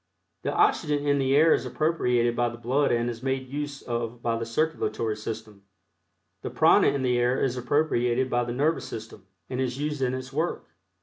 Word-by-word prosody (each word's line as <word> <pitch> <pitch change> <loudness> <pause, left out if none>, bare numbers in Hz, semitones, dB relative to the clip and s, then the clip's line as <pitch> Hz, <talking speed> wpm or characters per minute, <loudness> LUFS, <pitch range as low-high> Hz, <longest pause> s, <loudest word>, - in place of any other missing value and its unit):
The - - -2
oxygen 160 - +2
in 140 -1 +2
the 135 0 +2
air 160 +3 +6
is - - 0
appropriated 125 -7 +1
by 120 0 +1
the 120 - -9
blood 130 +5 +1
and 120 0 +1
is 115 -1 -5
made 135 0 -2
use 145 0 -5
of 120 0 -3
by 115 -1 +1
the 115 0 -4
circulatory 115 -5 -1
system. 110 -1 -7 0.8
The - - -4
prana - - +5
in 140 -2 +1
the 125 -1 +2
air 125 +2 +2
is 130 -2 0
appropriated 125 -1 +1
by 120 -1 0
the 120 - -4
nervous 145 +6 0
system, 110 -3 -9 0.2
and 130 0 -3
is 125 -1 -2
used 150 0 -3
in 130 0 +1
its 130 0 -7
work. 160 +4 -2
125 Hz, 195 wpm, -26 LUFS, 120-145 Hz, 0.8 s, air